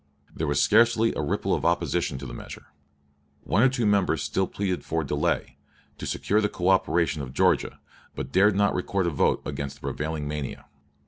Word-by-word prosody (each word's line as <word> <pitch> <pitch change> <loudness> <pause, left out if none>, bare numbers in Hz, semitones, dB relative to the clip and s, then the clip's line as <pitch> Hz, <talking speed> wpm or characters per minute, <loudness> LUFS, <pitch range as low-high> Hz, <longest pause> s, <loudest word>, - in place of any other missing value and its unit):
There 80 - -2
was 70 -1 +1
scarcely 115 -1 +4
a - - -2
ripple - - -1
of - - -1
opposition 85 -3 0
to 70 - -8
this - - -7
measure. - - -9 0.8
One 100 - +1
or 130 - +6
two 125 -3 -1
members 100 -8 +2
still 90 +6 0
pleaded 95 -3 -3
for 80 0 -2
delay, 70 - -1 0.4
to - - -5
secure 105 +2 +1
the 105 - +1
coöperation 90 -4 +1
of 65 -1 -8
Georgia, - - +2 0.4
but 65 0 -5
dared 100 +4 +4
not 100 0 +2
record 95 +1 -1
a 85 - 0
vote 70 - +1
against 70 -1 -4
the 70 - -21
prevailing 75 -1 -3
mania. 75 -2 -5
85 Hz, 185 wpm, -26 LUFS, 70-100 Hz, 0.8 s, or